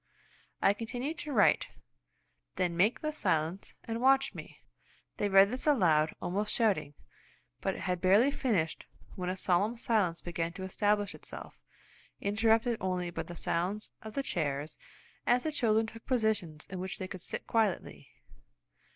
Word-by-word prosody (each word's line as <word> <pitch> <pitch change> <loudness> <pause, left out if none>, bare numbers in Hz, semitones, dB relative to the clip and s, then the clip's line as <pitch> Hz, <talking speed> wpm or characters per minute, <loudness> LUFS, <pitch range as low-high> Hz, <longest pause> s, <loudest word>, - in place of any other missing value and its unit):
I 200 - +6
continued 250 +8 -4
to 295 - -4
write; 210 -7 +4 0.9
"Then 175 -2 0
make 200 +7 +2
the 305 - -1
silence, 180 - -1
and 230 0 -4
watch 270 +1 +4
me." - - -10 0.6
They 205 - 0
read 195 +1 +6
this 255 +4 -3
aloud, 165 - +3
almost 205 +4 -2
shouting, 195 -10 +1 0.6
but - - -1
had 180 -2 -1
barely 205 +9 +5
finished 200 - -1 0.3
when 180 -1 -3
a 185 - -2
solemn 195 +6 +1
silence 205 -8 +1
began 170 -1 -3
to 190 - -7
establish 205 +1 +1
itself, - - -10 0.6
interrupted 225 +3 +2
only 180 -1 -1
by - - -3
the 175 - -8
sounds 185 +6 -1
of 220 -1 -9
the 275 - 0
chairs 150 - -2 0.5
as 245 +1 +4
the 315 - -1
children 225 -6 +2
took 225 +1 -11
positions 210 - 0
in 185 - -4
which 185 0 -4
they 185 - -5
could 185 -1 -8
sit - - -5
quietly. 220 -5 -1
200 Hz, 150 wpm, -31 LUFS, 180-230 Hz, 0.9 s, I